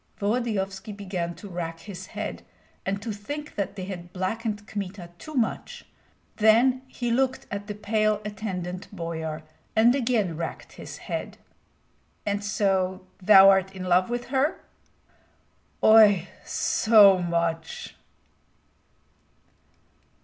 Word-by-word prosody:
Volodyovski 205 -2 -1
began 185 -4 -4
to 205 - -10
rack 165 -3 -5
his 200 -2 -9
head, - - -5 0.5
and 195 +1 -1
to 225 - -3
think 290 +9 -6
that 200 0 -3
they 185 -3 -5
had 175 -2 -7
blackened 210 +3 -3
Kmita 190 -3 -6
too 310 - -9
much; 235 -4 -2 0.5
then 235 +4 +4
he 245 -2 -3
looked 260 +2 0
at 205 0 -5
the 210 - -5
pale 215 0 +1
attendant 190 -3 -5
boyar 160 -4 -5 0.3
and 230 +2 +6
again 230 -10 0
racked 165 +1 -6
his - - -9
head. - - -5 0.9
"And 205 0 -1
so 190 -2 0 0.2
thou 195 0 +8
art 190 0 +1
in 185 - -6
love 180 +2 +3
with 240 0 -4
her?" 275 +3 +1 1.2
"Oi, 210 -5 +7 0.2
so 205 -4 +5
much!" 170 -2 -2
200 Hz, 120 wpm, -26 LUFS, 185-220 Hz, 1.2 s, thou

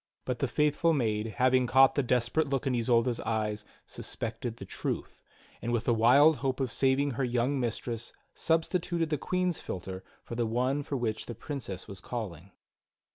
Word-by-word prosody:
But - - -2
the - - +1
faithful 150 +3 +2
maid, 110 -6 0
having 130 0 +4
caught 130 +1 +6
the 140 - +2
desperate 125 +4 +1
look 135 0 -1
in 135 - +1
Isolda's 120 0 +2
eyes, 105 -2 -2 0.2
suspected 115 +1 -5
the - - -8
truth, - - -4 0.4
and 120 - -2
with 120 -1 +1
the 120 - +3
wild 135 +7 +6
hope 130 +1 -1
of 130 -3 -1
saving 135 +1 +2
her 135 +2 -2
young 125 +3 +1
mistress 120 -1 -3 0.2
substituted 165 0 0
the 150 - 0
Queen's 180 0 0
philtre 95 +1 -6 0.2
for - - -8
the 115 -1 0
one 125 +5 0
for 140 -1 -3
which 115 -3 -2
the 120 - -5
Princess 110 - -6
was 100 - -9
calling. 100 -7 -6
125 Hz, 175 wpm, -30 LUFS, 115-140 Hz, 0.4 s, caught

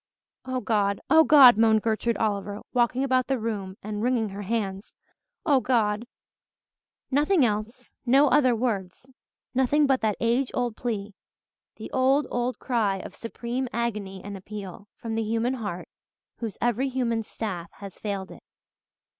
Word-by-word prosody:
"Oh 255 -1 -2
God 205 -5 +1
Oh 320 0 +8
God," 270 -8 +8
moaned 220 -1 +4
Gertrude 230 +1 0
Oliver, 205 -1 -2
walking 245 +2 +2
about 255 -2 +1
the 270 - 0
room 205 -4 -4
and 210 0 -4
wringing 235 -2 +1
her 200 +1 -7
hands, 200 -2 -3 0.5
"Oh 285 -5 +4
God!" 230 -3 0 1.0
Nothing 295 +2 +3
else 220 +3 -4
no 270 +4 +5
other 255 -5 +4
words 225 0 -3 0.4
nothing 265 +4 +3
but 270 -2 +2
that 215 -2 0
age 240 +3 +1
old 245 -3 -1
plea 215 -4 -4 0.6
the - - -9
old, 265 +3 +3
old 245 +1 -1
cry 220 -6 0
of 190 - -8
supreme 240 +4 -4
agony 210 -5 -3
and 205 0 -7
appeal, 200 0 -8
from 225 -1 -6
the 225 - 0
human 225 +3 0
heart 205 -8 -5 0.5
whose 225 -4 -5
every 240 +3 0
human 240 -3 -1
staff 190 -6 -5
has 200 -2 -11
failed 200 -2 -4
it. - - -12
230 Hz, 150 wpm, -26 LUFS, 205-255 Hz, 1.0 s, Oh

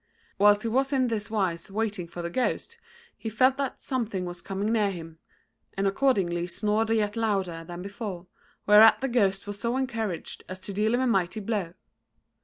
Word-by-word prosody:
Whilst 205 +1 +5
he - - -1
was 265 +4 +1
in 260 -3 +2
this 210 -3 -3
wise 185 -6 -1
waiting 205 -4 -2
for 175 +1 -7
the 170 - -3
ghost, 465 - -2 0.4
he 225 - -5
felt 255 +5 +3
that 275 -2 -3
something 225 -8 -2
was 175 0 -5
coming 195 +4 -2
near 210 -3 +2
him, 165 -3 -8 0.6
and 195 - 0
accordingly 195 -6 +1
snored 210 +4 0
yet 210 -2 +1
louder 195 -7 -1
than 175 +2 -8
before, 200 -3 -6 0.4
whereat 210 +3 +7
the 270 - 0
ghost 200 -6 +1
was 205 0 -5
so 235 +3 0
encouraged 225 -9 -3
as 185 0 -6
to 200 - -6
deal 215 +4 +2
him 250 - +1
a - - +2
mighty 195 -4 +1
blow. 195 -5 -3
210 Hz, 185 wpm, -27 LUFS, 185-230 Hz, 0.6 s, whereat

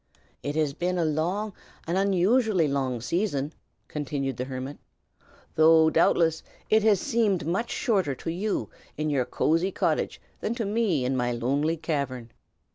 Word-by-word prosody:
"It 145 +1 -3
has 155 -3 +1
been 180 +4 -1
a 170 - +1
long, 180 +7 -1 0.3
an 170 - -1
unusually 195 0 +3
long, 135 -4 -1
season," 150 - -1 0.3
continued 140 -3 -3
the 125 - -2
hermit, 130 +2 -6 0.7
"though 160 0 +6
doubtless 165 -1 +3 0.3
it 220 0 +5
has 210 -3 +4
seemed 220 - +1
much 190 +8 -1
shorter 190 - 0
to 165 - -4
you 195 +5 -2 0.3
in 155 0 -1
your 130 -3 +1
cosey 165 +9 +1
cottage - - -1 0.2
than 230 - -2
to 230 -3 -2
me 200 - +1
in 130 +1 0
my 120 -1 0
lonely 140 +7 0
cavern. 140 -7 -3
160 Hz, 150 wpm, -26 LUFS, 140-195 Hz, 0.7 s, though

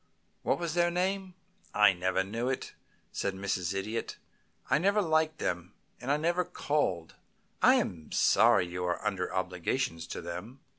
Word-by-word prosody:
What - - +1
was 170 -2 -3
their 175 0 +3
name?" 185 +1 -1 0.4
"I 105 -2 +6
never 95 +1 0
knew," 115 +6 -2 0.6
said 100 -1 -2
Mrs. 95 -1 -2
Idiot. 110 +4 -3 0.5
"I 140 - +3
never 200 +4 +3
liked 160 -3 +2
them, 90 0 -3 0.2
and 125 - -6
I 145 - +3
never 170 +4 +1
called. 120 - -1 0.5
I - - +7
am 80 -4 -2
sorry 90 - +5
you 90 +1 -5
are 90 +4 -2
under 100 -3 -1
obligations 90 -1 -2
to - - -5
them." 90 +10 -7
105 Hz, 150 wpm, -30 LUFS, -, 0.6 s, I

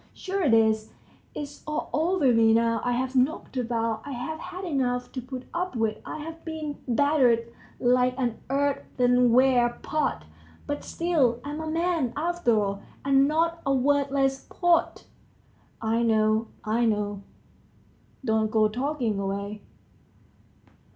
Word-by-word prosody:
Sure 385 +1 -3
it 270 -10 +4
is, 220 -1 +2 0.5
it's 290 -1 -7
all 305 0 -2
over 315 -3 +2
me 225 -1 +5
now; 230 -1 +2
I've 255 +2 -1
knocked 265 +2 0
about, 230 -3 -1
I've 285 +4 -5
had 370 +3 -7
enough 250 -6 -1
to 255 - -5
put 255 +1 -7
up 360 -3 -2
with, 220 -2 0
I've 325 +2 -7
been 310 -3 -5
battered 245 -3 +2 0.3
like 250 +1 +2
an 240 -4 -1
earthenware 250 -3 +3
pot, 300 - -1 0.4
but 290 0 -4
still 295 -9 +1
I'm 295 +2 -5
a 315 - -4
man, 325 -6 0
after 330 -8 +1
all, 200 -1 -2 0.2
and 275 0 +4
not 330 +2 0
a 275 -1 +1
worthless 275 0 +1
pot." 350 -1 +1 0.8
"I 225 +1 +1
know, 220 -1 +2 0.2
I 230 +2 +1
know, 205 -2 -1 1.0
don't 220 -2 +1
go 215 -1 +3
talking 245 -3 -1
away. 200 +1 -4
255 Hz, 130 wpm, -26 LUFS, 230-295 Hz, 1.0 s, me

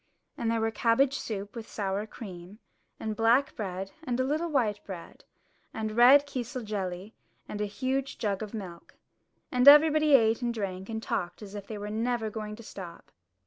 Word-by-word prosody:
And 230 - -2
there 230 -1 +1
were 225 0 +1
cabbage 255 +5 +2
soup 205 -1 -5
with 230 -1 -7
sour 200 +1 -2
cream, 190 -3 -10 0.4
and 220 -1 -3
black 235 +5 +3
bread 195 -2 -4
and 250 -4 -2
a - - +3
little 310 +6 -1
white 225 -9 0
bread, 180 -4 -10 0.5
and 220 -1 -2
red 265 +5 +7
kisel 255 -2 -5
jelly 195 -1 -4 0.3
and 210 - -5
a - - +1
huge 265 +5 -2
jug 200 -2 -1
of 210 -2 -5
milk. 185 -6 -8 0.6
And 250 +1 +2
everybody 305 0 +8
ate 225 -1 +3
and 240 -1 0
drank 195 -3 -4
and 220 0 -4
talked 180 +2 -3
as 200 -1 -10
if 205 -1 -7
they 215 - -6
were 205 0 -5
never 225 0 -1
going 210 -1 -5
to 230 - -12
stop. 180 -5 -10
220 Hz, 185 wpm, -29 LUFS, 200-250 Hz, 0.6 s, everybody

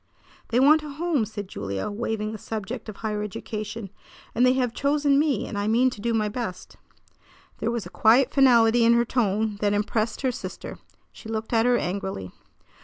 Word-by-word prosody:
"They 240 - +1
want 300 +4 +6
a 300 - -8
home," 300 -4 0
said 205 -2 -7
Julia, 100 - -4
waiving 215 0 -3
the 220 - -7
subject 220 +2 -6
of 210 - -7
higher 210 -1 -3
education; 210 0 -6 0.4
"and 240 - +2
they 255 0 +5
have 250 -3 0
chosen 285 0 +2
me, 290 -7 +1
and 205 - -4
I 205 - -1
mean 245 +4 +3
to 210 - -9
do 235 +2 0
my 220 -2 +1
best." 210 -4 -6 0.8
There 225 - -1
was 235 -4 -3
a 175 - -10
quiet 245 +7 +4
finality 240 -4 +5
in 230 +1 +5
her 235 0 +3
tone 215 -3 0
that 205 0 +1
impressed 215 +2 -1
her 260 -2 +1
sister. - - -8 0.3
She 220 - -12
looked 220 +1 -4
at 225 +1 +3
her 245 -1 +4
angrily. 185 - -4
225 Hz, 190 wpm, -25 LUFS, 210-250 Hz, 0.8 s, want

